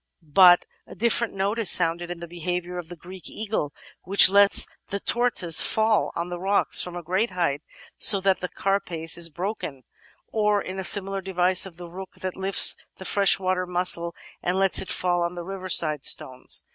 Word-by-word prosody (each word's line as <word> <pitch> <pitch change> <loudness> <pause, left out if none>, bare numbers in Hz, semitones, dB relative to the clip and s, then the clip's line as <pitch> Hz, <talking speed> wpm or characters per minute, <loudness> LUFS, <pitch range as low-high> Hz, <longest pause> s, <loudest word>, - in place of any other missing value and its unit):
But 175 +3 +4 0.2
a - - -13
different 235 -1 0
note 200 +4 -2
is 220 - +2
sounded 170 0 +1
in 175 -1 -8
the 170 - -8
behaviour 175 +1 -5
of 170 -2 -10
the 175 - -10
Greek 180 +2 -10
eagle, 210 -9 -4 0.3
which 195 0 +7
lets 200 0 +3 0.2
the 200 - -5
tortoise 215 -9 +2
fall 220 -1 +1
on 170 +1 -5
the 175 0 -7
rocks 195 +2 +3
from 180 -1 -6
a 175 - -7
great 185 +8 -2
height, 170 -6 -3 0.4
so 200 - +5
that 190 0 0
the 180 - -6
carapace 175 -5 -2
is 170 -1 +1
broken, 170 -6 -7 0.5
or 210 -1 +1
in 190 -1 -8
the 190 - -5
similar 195 +1 +1
device 185 0 +2
of 170 -3 -14
the 175 -1 -10
Rook 185 +2 -11
that 185 -1 -5
lifts 190 +1 +4 0.2
the 190 - -11
freshwater 185 -2 +1
mussel 175 -1 +1 0.3
and 180 +1 -2
lets 195 -1 +2
it 190 - -9
fall 175 -1 -1
on 170 +1 -3
the 175 - -7
riverside 170 -6 0
stones. 130 0 +1
185 Hz, 185 wpm, -23 LUFS, 175-195 Hz, 0.5 s, which